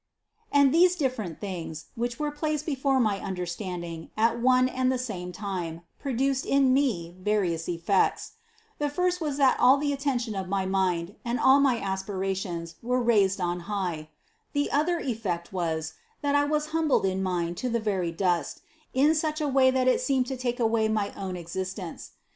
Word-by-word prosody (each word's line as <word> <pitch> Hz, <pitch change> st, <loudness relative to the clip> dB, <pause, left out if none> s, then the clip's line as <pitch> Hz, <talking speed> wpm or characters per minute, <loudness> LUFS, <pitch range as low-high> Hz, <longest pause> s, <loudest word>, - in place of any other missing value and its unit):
And 280 Hz, -2 st, +5 dB
these 355 Hz, +2 st, +5 dB
dif 265 Hz, -7 st, 0 dB
ferent 180 Hz, -9 st, -5 dB
things, 170 Hz, -5 st, -6 dB
which 235 Hz, +1 st, -3 dB
were 300 Hz, -1 st, -1 dB
placed 300 Hz, 0 st, -2 dB
before 270 Hz, -3 st, +1 dB
my 210 Hz, -5 st, +1 dB
understand 180 Hz, -1 st, -4 dB
ing 165 Hz, -1 st, -7 dB
at 230 Hz, +2 st, +2 dB
one 255 Hz, +1 st, +4 dB
and 255 Hz, 0 st, 0 dB
the 260 Hz, -, 0 dB
same 190 Hz, -8 st, -5 dB
time, 180 Hz, -4 st, -4 dB, 0.2 s
produced 270 Hz, 0 st, 0 dB
in 275 Hz, -2 st, +3 dB
me 200 Hz, -12 st, 0 dB
various 185 Hz, -5 st, 0 dB
effects: 175 Hz, +3 st, +1 dB, 0.5 s
The 295 Hz, 0 st, 0 dB
first 360 Hz, +3 st, 0 dB
was 295 Hz, -3 st, -2 dB
that 270 Hz, -2 st, +4 dB
all 255 Hz, +3 st, +6 dB
the 285 Hz, 0 st, 0 dB
attention 260 Hz, -5 st, -1 dB
of 190 Hz, -2 st, -4 dB
my 195 Hz, -1 st, 0 dB
mind 190 Hz, -1 st, 0 dB
and 240 Hz, +1 st, -1 dB
all 270 Hz, +1 st, +6 dB
my 270 Hz, -4 st, +3 dB
aspirations 190 Hz, -3 st, -3 dB
were 250 Hz, +2 st, 0 dB
raised 205 Hz, -5 st, +3 dB
on 175 Hz, -1 st, -1 dB
high; 175 Hz, -7 st, -3 dB, 0.4 s
the 285 Hz, -1 st, 0 dB
other 320 Hz, +5 st, +2 dB
effect 205 Hz, -, -3 dB
was, 160 Hz, -3 st, -2 dB, 0.3 s
that 285 Hz, 0 st, +1 dB
I 285 Hz, 0 st, +4 dB
was 300 Hz, +1 st, -1 dB
humbled 315 Hz, -9 st, +2 dB
in 190 Hz, 0 st, 0 dB
mind 175 Hz, -2 st, -1 dB
to 255 Hz, -, -2 dB
the 235 Hz, 0 st, 0 dB
very 190 Hz, -6 st, -1 dB
dust, 175 Hz, 0 st, -1 dB, 0.3 s
in 290 Hz, +4 st, +5 dB
such 310 Hz, 0 st, -1 dB
a 300 Hz, -, 0 dB
way 265 Hz, -1 st, +4 dB
that 260 Hz, 0 st, +1 dB
it 255 Hz, -, +3 dB
seemed 260 Hz, 0 st, +1 dB
to 265 Hz, -, -4 dB
take 250 Hz, 0 st, -2 dB
away 225 Hz, -1 st, +2 dB
my 215 Hz, -2 st, -1 dB
own 190 Hz, -2 st, -4 dB
exist 185 Hz, +2 st, -5 dB
ence. 180 Hz, -5 st, -7 dB
220 Hz, 185 wpm, -27 LUFS, 185-270 Hz, 0.5 s, all